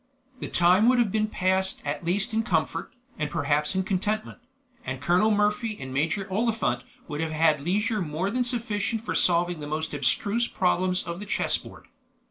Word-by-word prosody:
The -, -, -4 dB
time 185 Hz, +6 st, +4 dB
would 255 Hz, -, +4 dB
have 235 Hz, -5 st, +2 dB
been 215 Hz, +1 st, +1 dB
passed 190 Hz, -1 st, 0 dB
at 145 Hz, +4 st, -3 dB
least 200 Hz, +7 st, -1 dB
in 220 Hz, -, +2 dB
comfort, 165 Hz, -, -1 dB, 0.3 s
and 150 Hz, -1 st, -1 dB
perhaps 150 Hz, +4 st, 0 dB
in 190 Hz, -, +1 dB
contentment; 205 Hz, +5 st, -2 dB, 0.4 s
and 130 Hz, 0 st, -4 dB
Colonel 175 Hz, +8 st, +3 dB
Murphy 210 Hz, +1 st, +1 dB
and 130 Hz, -1 st, -7 dB
Major 165 Hz, +8 st, 0 dB
Oliphant 215 Hz, -, 0 dB, 0.3 s
would 150 Hz, -1 st, -4 dB
have 165 Hz, -1 st, -2 dB
had 155 Hz, -2 st, +3 dB
leisure 210 Hz, -, 0 dB
more 170 Hz, +4 st, -2 dB
than 250 Hz, +2 st, +1 dB
sufficient 230 Hz, -3 st, -2 dB
for -, -, -3 dB
solving 175 Hz, -1 st, +2 dB
the 145 Hz, -, -6 dB
most 155 Hz, +1 st, -3 dB
abstruse 200 Hz, -, +1 dB
problems 185 Hz, 0 st, +1 dB
of 170 Hz, +1 st, -5 dB
the 205 Hz, -, -8 dB
chess -, -, +1 dB
board. -, -, -13 dB
185 Hz, 180 wpm, -26 LUFS, 155-215 Hz, 0.4 s, time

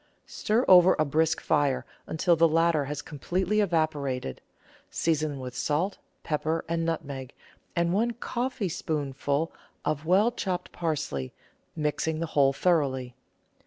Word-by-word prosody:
Stir 225 Hz, +5 st, 0 dB
over 180 Hz, 0 st, +8 dB
a 155 Hz, -, +2 dB
brisk 155 Hz, +2 st, +1 dB
fire 140 Hz, -5 st, +1 dB, 0.2 s
until 170 Hz, +2 st, +2 dB
the 165 Hz, +1 st, +5 dB
latter 165 Hz, -2 st, +2 dB
has 145 Hz, +1 st, -5 dB
completely 180 Hz, +7 st, -1 dB
evaporated; 150 Hz, -, -1 dB, 0.5 s
season 155 Hz, -3 st, 0 dB
with 125 Hz, -1 st, -7 dB
salt, 165 Hz, +7 st, -1 dB, 0.2 s
pepper, 160 Hz, +1 st, -1 dB
and 165 Hz, 0 st, -1 dB
nutmeg, 140 Hz, -6 st, -4 dB, 0.4 s
and 170 Hz, 0 st, +1 dB
one 230 Hz, +4 st, +1 dB
coffeespoonful 165 Hz, -, -2 dB, 0.3 s
of 155 Hz, 0 st, -1 dB
well 200 Hz, +7 st, +4 dB
chopped 190 Hz, -6 st, -3 dB
parsley, 145 Hz, -, -3 dB, 0.4 s
mixing 155 Hz, +1 st, -1 dB
the 165 Hz, -, -1 dB
whole 140 Hz, -2 st, +5 dB
thoroughly. 135 Hz, -6 st, +1 dB
160 Hz, 125 wpm, -27 LUFS, 145-175 Hz, 0.5 s, over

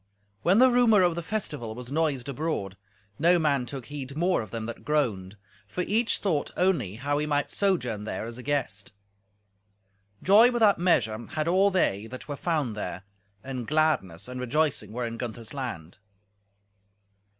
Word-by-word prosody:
When 185 Hz, +4 st, +4 dB
the 255 Hz, +2 st, +6 dB
rumour 230 Hz, -5 st, +5 dB
of 175 Hz, -1 st, +3 dB
the 170 Hz, -, -4 dB
festival 150 Hz, -, -3 dB
was 125 Hz, +1 st, -8 dB
noised 145 Hz, -5 st, 0 dB
abroad, 140 Hz, -, -3 dB, 0.4 s
no 175 Hz, +3 st, +5 dB
man 140 Hz, -6 st, +1 dB
took 135 Hz, -3 st, -6 dB
heed 140 Hz, 0 st, -7 dB
more 175 Hz, -1 st, +2 dB
of 110 Hz, -, -8 dB
them 115 Hz, +1 st, -4 dB
that 115 Hz, 0 st, -7 dB
groaned, 105 Hz, -10 st, -1 dB, 0.3 s
for 180 Hz, -, -3 dB
each 220 Hz, +6 st, +1 dB
thought 160 Hz, -8 st, -1 dB
only 175 Hz, -, +1 dB
how 145 Hz, +5 st, -1 dB
he 150 Hz, -, -1 dB
might 145 Hz, -1 st, 0 dB
sojourn 125 Hz, -, 0 dB
there 110 Hz, -, -4 dB
as 115 Hz, +1 st, -8 dB
a -, -, -6 dB
guest. 125 Hz, -9 st, -2 dB, 1.3 s
Joy 215 Hz, +6 st, +7 dB
without 225 Hz, -6 st, +3 dB
measure 115 Hz, -, +2 dB
had 155 Hz, 0 st, -2 dB
all 190 Hz, +3 st, +4 dB
they 110 Hz, -, 0 dB
that 130 Hz, +4 st, -9 dB
were 145 Hz, -, -4 dB
found 150 Hz, -8 st, -1 dB
there, 95 Hz, -2 st, -5 dB, 0.4 s
and 130 Hz, -3 st, -5 dB
gladness 155 Hz, -, +1 dB
and 125 Hz, 0 st, -6 dB
rejoicing 145 Hz, +1 st, 0 dB
were 120 Hz, +2 st, -3 dB
in 115 Hz, 0 st, -5 dB
Gunther's 115 Hz, -2 st, -6 dB
land. 100 Hz, -, -6 dB
145 Hz, 165 wpm, -27 LUFS, 115-170 Hz, 1.3 s, Joy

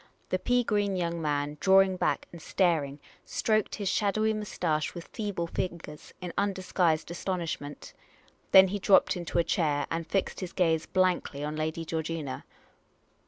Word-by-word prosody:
The -, -, 0 dB
pea 245 Hz, 0 st, +2 dB
green 205 Hz, -3 st, 0 dB
young 170 Hz, -2 st, -2 dB
man, 145 Hz, -1 st, -1 dB
drawing 190 Hz, 0 st, +5 dB
back -, -, 0 dB
and 170 Hz, -, -11 dB
staring, 155 Hz, -6 st, +1 dB, 0.2 s
stroked 215 Hz, -2 st, 0 dB
his 205 Hz, -2 st, -4 dB
shadowy 215 Hz, +2 st, +1 dB
moustache 175 Hz, -8 st, -2 dB
with 170 Hz, -, -8 dB
feeble 200 Hz, -6 st, -3 dB
fingers 165 Hz, -3 st, -5 dB
in 180 Hz, -1 st, -5 dB
undisguised 185 Hz, -5 st, 0 dB
astonishment. 170 Hz, -5 st, -4 dB, 0.6 s
Then 190 Hz, 0 st, +8 dB
he 205 Hz, +2 st, -2 dB
dropped 195 Hz, +1 st, +4 dB
into 175 Hz, -2 st, -3 dB
a 170 Hz, -, +4 dB
chair 150 Hz, -3 st, +1 dB
and 165 Hz, 0 st, -2 dB
fixed 195 Hz, +4 st, -1 dB
his 185 Hz, -2 st, -6 dB
gaze 165 Hz, -3 st, +1 dB
blankly 180 Hz, -6 st, 0 dB
on 150 Hz, +1 st, -3 dB
Lady 160 Hz, +2 st, -2 dB
Georgina. 160 Hz, -3 st, -4 dB
175 Hz, 150 wpm, -29 LUFS, 160-195 Hz, 0.6 s, Then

